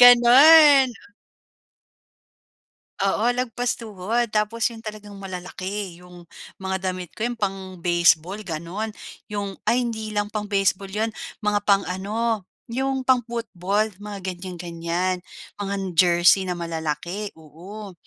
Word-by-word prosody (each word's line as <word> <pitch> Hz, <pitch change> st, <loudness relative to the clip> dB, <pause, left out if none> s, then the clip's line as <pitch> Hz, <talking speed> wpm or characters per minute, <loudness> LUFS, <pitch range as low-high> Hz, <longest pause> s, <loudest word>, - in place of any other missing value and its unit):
Gano'n. 255 Hz, -1 st, +7 dB, 1.9 s
Oo 205 Hz, +4 st, +2 dB
lagpas 245 Hz, 0 st, -1 dB
tuhod, 220 Hz, +1 st, -1 dB
tapos 220 Hz, +2 st, +1 dB
'yon 225 Hz, -, -11 dB
talagang 210 Hz, -1 st, -8 dB
malalaki, 185 Hz, 0 st, -6 dB
'yong 180 Hz, -1 st, -14 dB, 0.3 s
mga 190 Hz, 0 st, -2 dB
damit 180 Hz, -2 st, -6 dB
ko, -, -, -12 dB
'yong 240 Hz, -, -5 dB
pang-baseball 185 Hz, -2 st, +1 dB
gano'n, 175 Hz, +4 st, -4 dB, 0.4 s
'yong 200 Hz, -1 st, -3 dB, 0.2 s
ay 245 Hz, +1 st, +2 dB
hindi 220 Hz, -2 st, -4 dB
lang 205 Hz, 0 st, -2 dB
pang-baseball 200 Hz, -2 st, 0 dB
'yon, 215 Hz, +3 st, -2 dB, 0.3 s
mga 205 Hz, 0 st, +2 dB
pang-ano, 205 Hz, +3 st, 0 dB, 0.2 s
'yong 265 Hz, +2 st, -2 dB
pang-football, 220 Hz, -5 st, 0 dB
mga 205 Hz, -1 st, -6 dB
ganyan-ganyan. 175 Hz, 0 st, -3 dB, 0.4 s
Mga 200 Hz, 0 st, -2 dB, 0.2 s
jersey 175 Hz, +2 st, +5 dB
na 175 Hz, -, -2 dB
malalaki, 170 Hz, +4 st, -3 dB
oo, 185 Hz, +6 st, -10 dB
200 Hz, 105 wpm, -23 LUFS, 180-225 Hz, 1.9 s, Gano'n